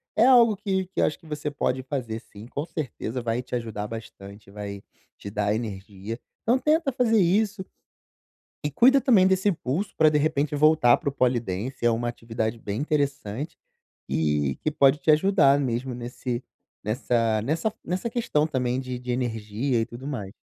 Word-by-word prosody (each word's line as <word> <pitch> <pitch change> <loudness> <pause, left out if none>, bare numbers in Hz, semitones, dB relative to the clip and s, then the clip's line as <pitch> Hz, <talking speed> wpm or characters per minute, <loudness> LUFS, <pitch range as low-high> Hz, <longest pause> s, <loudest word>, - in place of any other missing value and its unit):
é 220 - +5
algo 240 -4 +6
que 190 -2 -1
que 190 - -2
eu - - +5
acho 150 - -2
que 170 - -21
você 150 -1 -4
pode 130 -2 -1
fazer 125 -5 -4
sim, 105 +2 -13
com 145 +5 -4
certeza 130 -6 -4
vai 115 +1 -1
te 125 0 -14
ajudar 110 -3 -4
bastante, 105 -3 -10
vai 100 -1 -7 0.4
te 100 - -8
dar 105 0 0
energia. 105 0 -5 0.3
Então, 240 +4 +3
tenta 305 +2 +2
fazer 225 -3 +3
isso 200 +2 +1 1.0
e - - +1
cuida 260 - +5
também 225 -9 +5
desse 190 +1 +2
impulso 175 +1 -1
para, 155 -1 +5
de 150 - +2
repente, 150 -1 0
voltar 150 -5 +5
para - - -8
o - - -5
Polidance. 120 -2 -1
É - - +6
uma 120 +1 0
atividade 115 -1 -3
bem 105 +5 -4
interessante 140 -2 -2 0.5
e 75 -3 +1
que - - +2
pode 140 0 +4
te 155 - +3
ajudar 155 -4 +4
mesmo 125 -1 -2
nesse 120 +1 -4 0.4
nessa 115 0 +1
nessa 165 - -1
nessa 185 +7 -2
questão 190 -11 0
também 125 -3 -1
de 130 -1 -5
de 125 0 -4
energia 120 0 -1
e - - 0
tudo 130 +4 -9
mais. 105 -9 -5
130 Hz, 175 wpm, -25 LUFS, 115-160 Hz, 1.0 s, algo